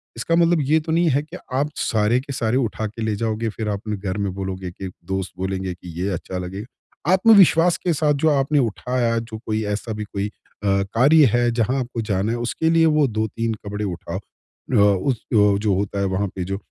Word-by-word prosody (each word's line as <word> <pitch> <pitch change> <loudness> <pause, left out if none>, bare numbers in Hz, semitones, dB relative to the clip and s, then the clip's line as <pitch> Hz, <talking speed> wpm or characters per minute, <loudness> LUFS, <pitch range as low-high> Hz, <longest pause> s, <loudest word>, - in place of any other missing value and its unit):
इसका 115 +9 0
मतलब 170 -1 +3
ये 155 +4 +3
तो 160 +1 -5
नहीं 170 +1 +3
है 140 0 +2
कि 160 +4 -10 0.2
आप 140 +3 +1
सारे 110 +2 +1
के 140 +2 -7
सारे 115 -1 0
उठा 110 -4 -1
के 110 +2 -9
ले 110 -1 0
जाओगे 110 +1 -1
फ़िर 110 0 -4
आप 100 -1 -2
अपने 105 -1 -3
घर 95 -1 -4
में 100 -2 -2
बोलोगे 95 -1 -4
कि 95 +2 -7 0.3
दोस्त 95 -1 -2
बोलेंगे 95 0 -3
कि 90 0 -12
ये 95 - 0
अच्छा 90 +1 -5
लगेगा। 100 - -6
आत्मविश्वास 185 -4 +6
के 175 - +3
साथ 150 -1 +2
जो 150 +3 +2
आपने 145 0 +2
उठाया 120 0 0
जो 115 -1 -7
कोई 110 0 -1
ऐसा 105 +2 -3
भी 105 0 -4
कोई 100 0 -3
अ, 100 -1 -2
कार्य 145 +6 +6
है 120 0 +3
जहाँ 120 +3 0
आपको 120 -2 -3
जाना 105 0 -1
है 120 - -1
उसके 120 +7 -1
लिए 165 0 +4
वो 150 -2 +3
2-3 110 0 -2
कपड़े 105 +1 -3
उठाओ। 90 -1 -5
अ, 105 - -10
उस 100 +5 +3 0.2
अ, 105 -2 +4
जो 105 0 +1
होता 100 +1 -2
है 100 - +1
वहाँ 95 +1 0
पे 95 - -3
जो 95 +2 -3
110 Hz, 220 wpm, -22 LUFS, 100-135 Hz, 0.3 s, आत्मविश्वास